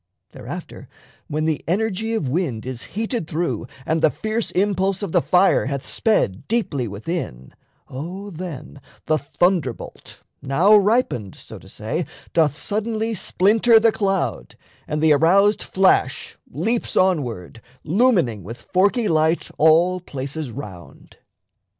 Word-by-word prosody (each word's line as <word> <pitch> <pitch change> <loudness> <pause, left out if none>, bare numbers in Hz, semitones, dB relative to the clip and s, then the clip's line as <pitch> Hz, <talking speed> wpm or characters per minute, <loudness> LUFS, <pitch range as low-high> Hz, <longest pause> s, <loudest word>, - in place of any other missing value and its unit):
Thereafter, - - -9 0.4
when 155 +1 -2
The 160 -2 -1
energy 220 +4 -1
of 185 -11 -1
wind 130 -6 -2
is 130 -2 -4 0.2
heated 225 - -2
through 150 -9 -2 0.2
And 160 0 0
the 160 - +5
fierce 220 +6 -2
impulse 195 0 0
of 195 - -3
the 175 - +3
fire 180 -4 +3
hath 140 -1 -4
sped 110 - 0
Deeply 175 - -1
within, 100 - -5 0.3
O 180 +9 -7
then 160 -5 -8 0.2
the 155 -1 +1
thunderbolt, 150 -2 -2 0.2
Now 165 +10 +4
ripened, 205 - +1
so - - -11
to - - -15
say, - - -3 0.3
doth 150 -3 +2
suddenly 220 +3 -2
Splinter 220 +4 +4
the 225 0 +4
cloud, 195 - -2 0.3
and 150 +1 -2
the 155 -1 +6
aroused 195 +7 +4
flash 185 -8 +1
Leaps 220 +10 -2
onward, 120 - 0 0.2
lumining 170 - +2
with 115 +6 -9
forky 200 - +1
light 160 0 +1
All 170 +4 +4
places 140 -2 -6
round. 105 -8 -11
170 Hz, 130 wpm, -21 LUFS, 140-205 Hz, 0.4 s, the